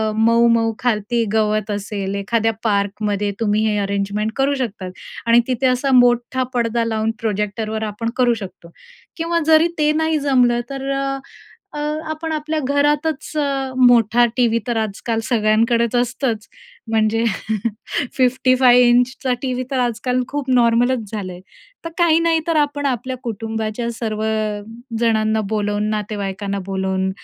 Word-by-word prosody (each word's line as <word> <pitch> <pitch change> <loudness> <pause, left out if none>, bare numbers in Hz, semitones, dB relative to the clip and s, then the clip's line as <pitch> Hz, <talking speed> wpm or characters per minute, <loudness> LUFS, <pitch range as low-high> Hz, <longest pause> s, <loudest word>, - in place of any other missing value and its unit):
मऊ-मऊ 230 0 +3
खालती 230 0 0
गवत 215 -1 +1
असेल. 200 -1 -3
एखाद्या 225 +3 0
पार्कमध्ये 205 -1 0
तुम्ही 215 -1 +1
हे 210 - 0
अरेंजमेंट 200 +2 -1
करू 275 +1 +1
शकतात 205 -8 -4 0.3
आणि 235 0 +5
तिथे 260 +1 +1
असा 255 +2 +1
मोठा 245 +1 +2
पडदा 235 -1 0
लावून 220 0 0
प्रोजेक्टरवर 215 +1 -2
आपण 215 +2 -3
करू 245 -2 +4
शकतो 190 -6 -9 0.5
किंवा 335 +1 0
जरी 320 +1 +5
ते 300 -1 +3
नाही 320 0 +1
जमलं 250 -4 +3
तर 275 -1 -5
अ, 275 0 -1 0.6
अ, 295 - -6 0.3
आपण 320 +1 -4
आपल्या 310 0 -2
घरातचं 295 +2 0
अ, 275 -2 -1
मोठा 240 0 +5
टीव्ही 230 -2 +3
तर 240 -2 -1
आजकाल 225 +2 -3
सगळ्यांकडेच 230 +1 +2
असतंच. 245 -3 -1 0.4
म्हणजे 225 +1 +2 0.9
55 255 -1 +4
इंचचा 250 +2 +2
टीव्ही 255 -1 -2
तर 265 - -1
आजकाल 250 +1 0
खूप 285 -2 -3
नॉर्मलच 245 +1 +3
झालंय 185 -4 -5 0.4
तर 330 - -4
काही 330 -2 +4
नाही 330 -1 +2
तर 330 - +1
आपण 290 -1 0
आपल्या 255 0 -2
कुटुंबाच्या 225 0 -3
सर्वजणांना 220 0 -1
बोलवून 210 -1 -1
नातेवाईकांना 200 -2 -3
बोलवून 190 -1 -1
230 Hz, 130 wpm, -20 LUFS, 215-260 Hz, 0.9 s, आणि